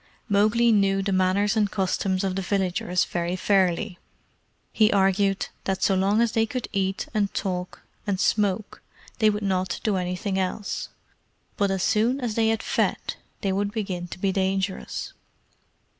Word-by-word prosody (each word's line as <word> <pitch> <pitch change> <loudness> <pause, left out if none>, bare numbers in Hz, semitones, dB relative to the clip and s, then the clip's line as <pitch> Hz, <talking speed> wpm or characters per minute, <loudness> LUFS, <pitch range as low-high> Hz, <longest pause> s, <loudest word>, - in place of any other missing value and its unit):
Mowgli 215 +3 +3
knew 195 -2 +3
the 200 - -1
manners 190 +3 +2
and 210 -2 +2
customs 190 -1 0
of 190 -1 -1
the 195 - -1
villagers 180 -2 0
very 175 +1 -2
fairly. 185 0 +1 0.7
He 215 0 +4
argued 195 0 +2 0.2
that 190 -1 -1
so 195 - +4
long 195 +4 +2
as 235 -2 +2
they 225 -1 +1
could 250 +1 -4
eat, 195 -1 -1
and 205 -2 +1
talk, 180 -2 -3 0.2
and 195 -2 0
smoke, 205 0 0 0.4
they 215 -2 +5
would 210 0 -2
not 185 -2 -1
do 210 -3 +1
anything 185 +2 -2
else; 190 +2 -3 0.7
but 200 -1 +1
as 190 -1 -1
soon 230 +5 +2
as 240 -4 -2
they 225 0 +2
had 225 0 0
fed - - 0 0.3
they 195 - 0
would 200 +1 -1
begin 190 -5 -3
to - - -8
be 195 +1 0
dangerous. 190 0 -2
195 Hz, 160 wpm, -25 LUFS, 190-210 Hz, 0.7 s, they